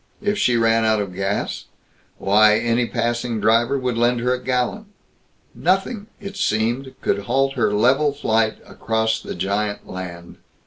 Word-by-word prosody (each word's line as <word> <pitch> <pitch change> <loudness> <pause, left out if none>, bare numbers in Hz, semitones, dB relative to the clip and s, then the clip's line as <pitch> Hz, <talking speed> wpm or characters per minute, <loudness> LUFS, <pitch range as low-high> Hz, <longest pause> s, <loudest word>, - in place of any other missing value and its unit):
If 205 0 +1
she 125 - +3
ran 115 0 +3
out 110 -1 +2
of 100 -3 -4
gas 95 +2 -2 0.5
why, 105 +2 +4
any 120 +1 +1
passing 120 -1 -2
driver 115 +5 +3
would 125 -3 -2
lend 120 +1 +2
her 125 +1 +1
a 125 - -4
gallon. 130 - -1 0.7
Nothing, 200 +3 0
it 200 0 -8
seemed, 120 - -1
could 100 - -1
halt 135 +3 +1
her 120 -5 +1
level 130 +8 +3
flight 110 -6 0
across 110 0 -1
the - - -7
giant 100 +3 -2
land. 90 -2 -8
115 Hz, 150 wpm, -21 LUFS, 110-130 Hz, 0.7 s, why